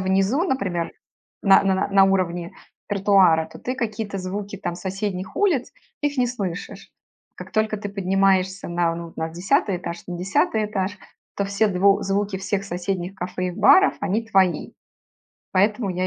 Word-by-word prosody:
внизу, 195 - +1
например, 185 - -2 0.5
на 195 0 +6
на 190 -1 +3
на 190 - 0
на 195 -1 +5
уровне 175 -3 0 0.4
тротуара, 190 -5 +4
то - - -11
ты 255 - -3
какие-то 215 -4 -3
звуки 200 +2 -5
там, 175 - -4
соседних 190 0 -4
улиц, 335 -11 +1 0.3
их 290 -2 -1
не 250 - +3
слышишь. 200 -8 -5 0.4
Как - - -10
только 215 -1 0
ты 205 - -5
поднимаешься 195 -1 +1
на, 170 -1 0
ну, 170 0 -7
на 160 0 -3
10 185 - +1
этаж, 170 -1 -6
на 175 -1 -5
10 205 +3 +1
этаж, 205 -1 -3 0.4
то 200 - +1
все 200 +2 +1
дв 195 +1 +3
звуки 195 0 -1
всех 195 +1 -2
соседних 180 0 -3
кафе 185 0 -3
и - - -2
баров- 380 - +5
они 205 +3 -1
твои. 190 -7 +2 0.8
Поэтому 205 +2 +2
я 185 +1 -1
195 Hz, 160 wpm, -23 LUFS, 180-205 Hz, 0.8 s, на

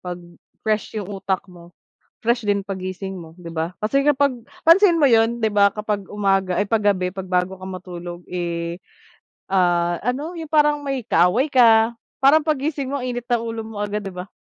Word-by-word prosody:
'pag 180 -1 -5 0.5
fresh 215 0 -1
yung 205 -1 -4
utak 190 -1 -1
mo, 175 -2 -16 0.4
fresh 235 0 0
din 200 -1 0
paggising 190 0 -5
mo, 165 -3 -10
'di 170 - -10
ba? 165 +1 -3
Kasi 275 +6 +1
kapag 285 -2 +3 0.3
pansin 345 0 +6
mo 285 - +5
'yon, 230 0 +3
'di 220 - +2
ba? 200 0 +5
Kapag 210 -1 -3
umaga, 195 -3 +1
ay, 205 - 0
'pag 220 -1 +1
gabi, 185 -2 +1
'pag 190 -1 -7
bago 180 +1 +1
ka 185 - -14
matulog, 175 -2 -7
eh, 170 -1 -3 0.7
ah, 175 -2 +2
ano, 285 +8 -2
yung 320 -2 -7
parang 295 -1 +3
may 275 -1 -2
kaaway 180 - +3
ka, 230 -4 +5 0.2
parang 285 +3 +5
paggising 285 -2 -1
mo, 280 - -1
init 245 -1 -4
ng 240 -1 0
ulo 225 -1 -4
mo 220 -2 -8
agad, 205 0 -2
'di 195 - -6
ba? 180 +1 -7
205 Hz, 185 wpm, -21 LUFS, 185-255 Hz, 0.7 s, pansin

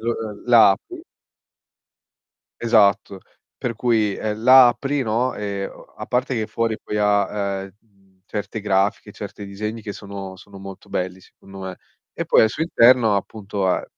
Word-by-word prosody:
lo 115 +1 -1
l 110 -3 -7
la 120 -4 +7
apri. 330 - -5 1.6
Esatto. 105 -4 +3 0.4
Per 120 -2 -3
cui, 110 -4 +1
uhm, 110 0 -3
la 130 0 +8
apri, 135 +3 -1
no, 120 +2 0
ehm, 100 -1 -4 0.3
a - - -7
parte 125 +1 -1
che 110 -2 -2
fuori 115 0 -1
poi 105 - -4
ha, 100 -1 0
uhm, 95 -1 -21
certe 105 +1 -5
grafiche, 100 +1 0
certi 100 0 -8
disegni 105 +3 -5
che 100 -1 -6
sono 100 -2 -8
sono 100 +1 -14
molto 95 0 -11
belli 90 +1 -3
secondo 95 +1 -15
me. 95 -1 -6 0.4
E - - -4
poi - - +5
al 110 - +4
suo 125 - -4
interno, 120 -8 +4
appunto, 100 -1 -4
ha 90 - 0
105 Hz, 160 wpm, -21 LUFS, 100-115 Hz, 1.6 s, la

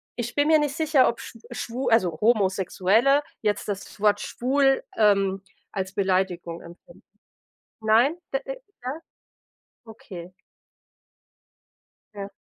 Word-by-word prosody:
ich 240 0 -4
bin 290 +1 +3
mir 315 -1 +5
nicht 290 -2 -1
sicher, 310 -4 +3
ob 235 - -1
schw 230 - -10
schw 245 +1 -4
also, 180 -8 +2
Homosexuelle, 210 - +3 0.2
jetzt 210 -1 -1
das 200 0 -6
Wort 210 0 +3
„schwul“, 270 +2 +1
ähm, 195 -2 +3 0.3
als 190 -1 -4
Beleidigung 185 -4 -1
empfinden. 175 - -15 0.8
Nein? 230 +8 +4 0.2
D - - +3
äh, - - -7 0.2
ja? 270 +6 -4 0.9
Okay. 185 -5 -10 1.8
Ja. 200 0 -7
220 Hz, 115 wpm, -25 LUFS, 195-270 Hz, 1.8 s, mir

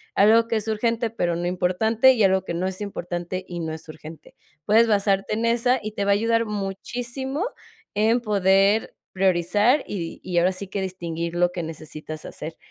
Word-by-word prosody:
algo 225 +3 +5
que 230 - -1
es 215 0 -4
urgente 230 +1 0
pero 175 -6 -1
no 175 +1 -2
importante 220 +8 +3
y 225 -5 +1
algo 190 -1 +3
que - - -4
no 175 +2 -2
es 190 0 -5
importante 180 -2 -4
y 175 -2 -6
no 160 -1 -3
es 160 0 -10
urgente. 155 +1 -11 0.3
Puedes 225 +2 +5
basarte 200 -1 +1
en 225 +2 -1
esa, 240 +2 +2
y 215 - -4
te 200 - -2
va 200 - +3
a - - +6
ayudar 230 +2 +2
muchísimo 240 - -4 0.5
en 225 +4 +2
poder 200 0 +2 0.2
priorizar, 195 - +2
y 170 -5 -5
y 180 -2 -3
ahora 180 +2 +4
sí 195 +2 -6
que 200 - -3
distinguir 170 -3 -4
lo 175 0 +2
que 175 -1 -4
necesitas 155 -1 -8
hacer, 160 +2 -7
195 Hz, 190 wpm, -24 LUFS, 175-225 Hz, 0.5 s, a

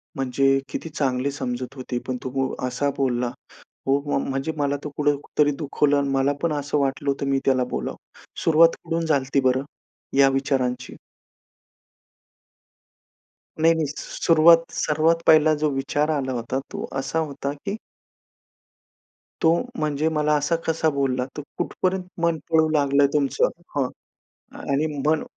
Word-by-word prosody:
म्हणजे 135 +1 +2
किती 165 - -5
चांगली 135 -2 -1
समजत 130 -1 -4
होते 125 -2 -4
पण 130 -1 -2
तो 130 - -3
वो 135 -1 0
असा 140 +3 -1
बोलला, 125 -2 0 0.6
हो 135 - +4
वो 145 - 0
म्हणजे 135 +3 -2
मला 145 -1 0
तो 150 - -4
कुठं 145 -1 +2 0.2
तरी 145 0 +5
दुखवलं 145 -1 +1
आणि 140 -1 0
मला 135 +1 +2
पण 165 -2 +1
असं 145 0 -1
वाटलं 135 +1 -1
होतं 140 0 -1
मी 135 - +2
त्याला 130 -1 +3
बोलावं. - - -3 0.5
सुरुवात 165 +1 +5
कुठून 165 0 -2
झाली 145 -4 +2
होती 140 +1 +1
बरं, 130 +1 +1 0.5
या 135 -1 +7
विचारांची? 130 -2 -1 2.7
नाही, 165 0 +6
नाही, 160 -2 0
सुरुवात 165 0 +4 0.2
सर्वात 160 +2 +2
पहिला 155 0 +6
जो 150 - +3
विचार 140 +3 0
आला 130 -2 -2
होता 120 +1 -2
तो - - -4
असा 135 +4 -2
होता, 140 -2 -3
की 195 +9 -5 1.7
तो 160 - +5 0.3
म्हणजे 150 0 0
मला 150 -1 +1
असा 150 +3 +1
कसा 160 0 +1
बोलला 135 -3 0
तर 150 - -4 0.2
कुठपर्यंत 185 0 -1 0.2
मन 170 -1 +2
पळू 160 -1 +4
लागलंय 140 -2 +3
तुमचं 140 -2 +2 0.3
हां, 135 - +2 0.7
आणि 140 +3 0 0.2
मन 155 0 +2
140 Hz, 145 wpm, -23 LUFS, 135-155 Hz, 2.7 s, या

